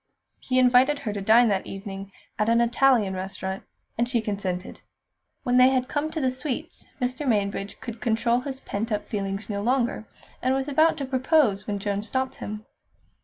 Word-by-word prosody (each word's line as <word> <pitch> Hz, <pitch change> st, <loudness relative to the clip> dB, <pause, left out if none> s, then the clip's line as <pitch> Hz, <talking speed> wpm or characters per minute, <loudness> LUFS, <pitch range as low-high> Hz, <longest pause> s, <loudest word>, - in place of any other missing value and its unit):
He 255 Hz, -, -1 dB
invited 255 Hz, +3 st, +5 dB
her 225 Hz, -7 st, -4 dB
to 205 Hz, -, -4 dB
dine 225 Hz, +4 st, +6 dB
that 195 Hz, -2 st, 0 dB
evening 195 Hz, 0 st, -7 dB, 0.3 s
at 215 Hz, +1 st, +2 dB
an 230 Hz, 0 st, +4 dB
Italian 235 Hz, -3 st, +3 dB
restaurant, 190 Hz, 0 st, -4 dB, 0.4 s
and 240 Hz, +1 st, +1 dB
she 245 Hz, -2 st, +2 dB
consented. 195 Hz, -4 st, -4 dB, 0.6 s
When 250 Hz, -2 st, +2 dB
they 255 Hz, +1 st, +7 dB
had 255 Hz, -1 st, +1 dB
come 295 Hz, +2 st, -1 dB
to 315 Hz, -, -4 dB
the 260 Hz, -3 st, +1 dB
sweets, 290 Hz, +4 st, -5 dB
Mr. 255 Hz, +3 st, -2 dB
Mainbridge 200 Hz, -3 st, -1 dB
could 235 Hz, -2 st, -7 dB
control 235 Hz, +1 st, +2 dB
his 265 Hz, +1 st, -6 dB
pent 225 Hz, +3 st, -4 dB
up 210 Hz, -1 st, -2 dB
feelings 200 Hz, 0 st, -3 dB
no 200 Hz, -2 st, -3 dB
longer, 240 Hz, -1 st, 0 dB, 0.4 s
and 260 Hz, +1 st, +2 dB
was 270 Hz, +1 st, -1 dB
about 310 Hz, +3 st, +3 dB
to 280 Hz, -, -3 dB
propose 260 Hz, -5 st, +2 dB
when 205 Hz, -1 st, -1 dB
Joan 200 Hz, 0 st, -2 dB
stopped 260 Hz, +4 st, -2 dB
him. 210 Hz, +1 st, -6 dB
235 Hz, 180 wpm, -25 LUFS, 200-260 Hz, 0.6 s, they